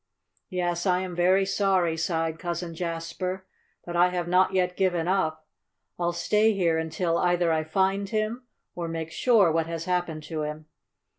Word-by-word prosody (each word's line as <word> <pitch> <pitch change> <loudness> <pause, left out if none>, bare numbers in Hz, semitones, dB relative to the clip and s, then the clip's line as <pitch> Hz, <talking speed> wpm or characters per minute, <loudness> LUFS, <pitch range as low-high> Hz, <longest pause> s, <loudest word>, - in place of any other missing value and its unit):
"Yes, 175 0 -1
I 180 0 +2
am 185 -2 -5
very 185 +3 +3
sorry," 190 -4 +1
sighed 160 -1 -1
Cousin 170 -1 -4
Jasper. 170 +3 -4 0.4
"But 175 - -5
I 175 +1 +5
have 175 -1 -3
not 185 +2 +3
yet 180 -1 +1
given 175 -3 +1
up. 160 -5 0 0.5
I'll 175 0 +1
stay 210 +6 +2
here 170 -5 +1
until 165 +1 -1
either 175 -2 +2
I 160 0 +1
find 190 +4 0
him, 225 +3 -2 0.3
or 170 -1 -4
make 165 -1 -4
sure 210 -3 +4
what 165 0 0
has 165 0 -4
happened 175 -4 -1
to 155 0 -4
him. 150 +1 -5
175 Hz, 165 wpm, -26 LUFS, 165-185 Hz, 0.5 s, I